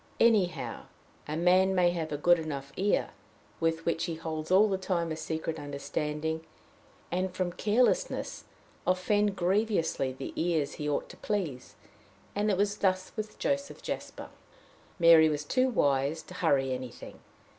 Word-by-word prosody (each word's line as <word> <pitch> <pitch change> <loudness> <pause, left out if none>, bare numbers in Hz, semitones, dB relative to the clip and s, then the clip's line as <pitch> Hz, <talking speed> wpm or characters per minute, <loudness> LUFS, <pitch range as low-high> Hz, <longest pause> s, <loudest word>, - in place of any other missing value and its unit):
Anyhow, 210 -6 +2 0.4
a 150 +1 -3
man 185 +2 +4
may 175 -1 +4
have 165 -3 -3
a 145 - -1
good 175 +3 +4
enough 140 -3 -5
ear, 200 +2 +1 0.5
with 165 0 0
which 165 -1 0
he 170 -2 -3
holds 160 -1 -5
all 195 +4 +6
the 190 -2 -1
time 170 -3 -1
a - - -2
secret 160 +1 -4
understanding, 150 +2 -3 0.7
and 185 +1 0
from 180 -1 -2
carelessness 240 - +1 0.4
offend 205 +2 +2
grievously 185 -7 +1
the 130 +1 -7
ears 160 -4 0
he 150 0 -3
ought 145 - -1
to - - -12
please; 170 -12 -3 0.6
and 205 +1 0
it 195 - +2
was 205 +1 +1
thus 185 -2 0
with 215 -1 -5
Joseph 280 0 -2
Jasper. - - -6 0.7
Mary 165 -2 +7
was 150 -1 -2
too 255 - +2
wise 145 - +1
to - - -12
hurry 140 -7 +1
anything. 125 -1 -8
170 Hz, 150 wpm, -29 LUFS, 155-195 Hz, 0.7 s, Mary